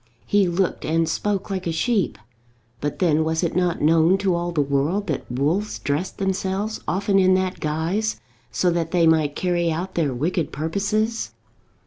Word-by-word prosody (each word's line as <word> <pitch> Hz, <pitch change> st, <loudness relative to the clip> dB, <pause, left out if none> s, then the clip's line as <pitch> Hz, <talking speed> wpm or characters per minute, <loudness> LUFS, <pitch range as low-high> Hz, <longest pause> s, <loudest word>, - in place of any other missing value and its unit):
He 205 Hz, -2 st, +3 dB
looked 175 Hz, +2 st, -1 dB
and 165 Hz, +1 st, +1 dB
spoke 200 Hz, +1 st, -1 dB
like 185 Hz, -2 st, -3 dB
a -, -, 0 dB
sheep; 200 Hz, +5 st, 0 dB, 0.6 s
but 145 Hz, +2 st, -3 dB
then, 160 Hz, -4 st, +2 dB
was 160 Hz, +2 st, 0 dB
it 170 Hz, -, -1 dB
not 180 Hz, -4 st, 0 dB
known 165 Hz, +4 st, +4 dB
to 195 Hz, -2 st, +1 dB
all 175 Hz, 0 st, -1 dB
the 165 Hz, -, -2 dB
world 145 Hz, +8 st, +1 dB
that 150 Hz, -7 st, -4 dB
wolves 155 Hz, +12 st, 0 dB
dressed 150 Hz, +6 st, -2 dB
themselves 195 Hz, +2 st, -2 dB
often 195 Hz, +1 st, +2 dB
in 185 Hz, 0 st, +5 dB
that 185 Hz, 0 st, -1 dB
guise, 165 Hz, +8 st, -1 dB, 0.3 s
so 180 Hz, -, +1 dB
that 170 Hz, -1 st, -1 dB
they 170 Hz, -1 st, +3 dB
might 155 Hz, -3 st, +3 dB
carry 175 Hz, -2 st, 0 dB
out 180 Hz, +4 st, -3 dB
their 155 Hz, -5 st, 0 dB
wicked 155 Hz, +5 st, -1 dB
purposes? 205 Hz, +8 st, -1 dB
175 Hz, 170 wpm, -23 LUFS, 160-195 Hz, 0.6 s, in